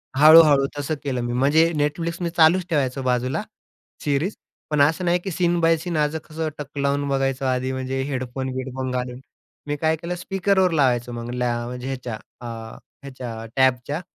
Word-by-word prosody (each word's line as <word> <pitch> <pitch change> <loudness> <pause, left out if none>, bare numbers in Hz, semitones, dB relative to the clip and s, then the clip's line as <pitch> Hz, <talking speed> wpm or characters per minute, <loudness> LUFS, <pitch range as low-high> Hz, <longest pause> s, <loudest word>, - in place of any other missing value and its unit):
हळू-हळू 150 -1 +8
तसं 145 +2 -2
केलं 130 -3 -2
मी. 120 0 -2
म्हणजे 150 +6 +3
Netflix 165 +3 -1
मी 170 - 0
चालूच 170 +2 +4
ठेवायचो 135 -5 0
बाजूला 125 0 0 0.6
सीरीज. 150 +7 0 0.3
पण 150 -2 +2
असं 160 +5 +2
नाही 175 +1 +2
की 195 - -3
सीन 175 0 +1
बाय 165 0 +4
सीन 170 +1 -3
आज 150 +1 +1
कसं 155 0 -4
टक 145 -1 -8
लावून 140 0 0
बघायचं 135 -1 0
आधी, 130 0 0
म्हणजे 130 0 -3
हेडफोन-बिडफोन 130 0 -4
घालून. 125 0 -3 0.5
मी 145 - -1
काय 160 +2 +1
केलं, 170 +2 -5
स्पीकरवर 190 0 +1
लावायचो 125 -6 +1
मग 120 0 -6
लॅ 125 -1 0
म्हणजे 125 +1 -6
ह्याच्या 125 -4 -4 0.2
अ, - - -8 0.6
ह्याच्या 125 -5 -7
टॅबच्या 130 +3 +1
140 Hz, 165 wpm, -23 LUFS, 130-160 Hz, 0.6 s, हळू-हळू